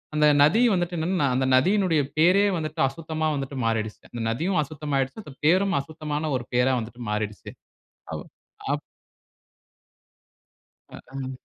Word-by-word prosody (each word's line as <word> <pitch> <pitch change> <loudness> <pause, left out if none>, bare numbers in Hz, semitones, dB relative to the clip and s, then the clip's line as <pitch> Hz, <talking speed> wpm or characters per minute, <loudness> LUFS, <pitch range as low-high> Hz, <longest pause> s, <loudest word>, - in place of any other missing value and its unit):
அந்த 150 0 +5 0.2
நதி 175 +11 +4
வந்துட்டு 175 -1 -1
என்னனா, 165 -3 +1
அந்த 130 0 +1
நதியினுடைய 180 +1 +3 0.2
பேரே 185 +5 +5
வந்துட்டு, 155 0 -5
அசுத்தமா 160 +1 -3
வந்துட்டு 135 0 -4
மாறிடிச்சு. 110 -1 -1
அந்த 120 - -5
நதியும் 165 +9 0
அசுத்தமாயிடுச்சு. 145 +4 -3
அந்த 145 - -10
பேரும் 190 +3 +3
அசுத்தமான 155 0 -4
1 120 - -8
பேரா 125 +2 +3
வந்துட்டு 120 +2 -9
மாறிடிச்சு. 105 -1 -4 0.6
அவ் - - -5 0.5
அப் - - -2 2.1
ஹ், - - -17
அ. 130 -1 -6
150 Hz, 130 wpm, -25 LUFS, 130-170 Hz, 2.1 s, அந்த